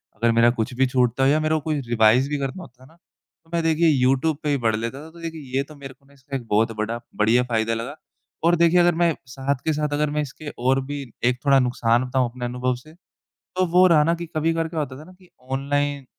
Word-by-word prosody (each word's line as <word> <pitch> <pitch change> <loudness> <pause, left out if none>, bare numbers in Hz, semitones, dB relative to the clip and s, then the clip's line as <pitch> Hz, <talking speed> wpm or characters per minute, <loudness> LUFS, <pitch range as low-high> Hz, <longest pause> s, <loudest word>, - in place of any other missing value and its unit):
अगर 115 +1 +2
मेरा 115 +1 +5
कुछ 115 +1 -3
भी 130 +2 +2
छूटता 125 0 +1
हो 135 - +5
या 155 +2 +3
मेरा 155 0 +1
कोई 150 -2 0
रिवाइज़ 120 +4 +4
भी 150 - -1
करना 140 +7 -4
होता 130 -4 -15
है - - -16
ना, 165 - -22 0.5
तो 165 - -27
मैं 170 -1 0
देखिए 165 0 +3
यूट्यूब 135 +2 +2
पे 150 - -1
ही 140 - +2
पढ़ 110 - +2
लेता 115 +7 -5
था, - - -11
तो 170 - -15
देखिए 155 -6 -5
ये 135 - +1
तो - - -11
मेरे 135 -1 -10
को 140 - -32
ना 140 - -23
इससे 135 0 -9
एक 120 -4 -5
बहुत 110 +2 +2
बड़ा 115 +2 -2 0.2
बढ़िया 115 +4 +3
फ़ायदा 115 -2 0
लगा 120 +6 -5 0.5
और 175 +1 +5
देखिए 170 +1 +4
अगर 175 -1 +4
मैं 170 -1 +2
साथ 135 +2 -2
के 160 - +2
साथ 150 0 -2
अगर 150 0 +1
मैं 150 - +1
इसके 145 +2 -7 0.2
और 135 +1 +3
भी 145 0 -5 0.2
एक 125 0 +1
थोड़ा 135 -1 +5
नुकसान 120 -1 +1
बताऊँ 125 -1 0
अपने 125 0 -6
अनुभव 125 +1 -1
से, 155 +6 -15 0.4
तो 185 0 -3
वो 180 +2 +5
रहा 155 -3 +5
ना 170 +1 +2
कि 170 0 -6
कभी-कभार 165 +1 0
क्या 160 -1 -3
होता 130 -3 -4
था 155 - -11
ना 185 - -15
कि 180 -1 -22 0.2
ऑनलाइन 140 0 -1
140 Hz, 255 wpm, -23 LUFS, 125-155 Hz, 0.5 s, मेरा